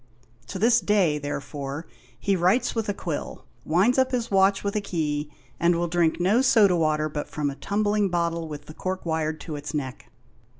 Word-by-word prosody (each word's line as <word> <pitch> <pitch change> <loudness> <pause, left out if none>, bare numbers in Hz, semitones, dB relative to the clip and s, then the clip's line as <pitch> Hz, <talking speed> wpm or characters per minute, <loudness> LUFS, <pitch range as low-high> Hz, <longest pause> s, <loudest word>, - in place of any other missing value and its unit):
To - - -5
this 230 +4 +4
day, 185 -8 +2
therefore, 145 +1 -5 0.3
he 200 +7 +1
writes 185 +8 +2
with 225 -2 -2
a - - +1
quill, 165 -7 -5 0.2
winds 195 +11 +3
up 260 0 +3
his 240 -3 -2
watch 195 0 +3
with 200 0 -2
a 210 - +1
key, 150 -6 -2 0.3
and 170 0 +3
will 170 +1 0
drink 170 -1 +1
no 200 +8 +3
soda 215 -8 +5
water 155 -2 +1
but 150 -1 -5
from 145 -2 -2
a - - -8
tumbling 205 +3 0
bottle 170 -1 -1
with 145 -1 -8
the 155 - -10
cork 185 +3 -4
wired 160 -1 -1
to 155 - -6
its 145 +2 -6
neck. 130 -3 -5
170 Hz, 195 wpm, -25 LUFS, 150-200 Hz, 0.3 s, soda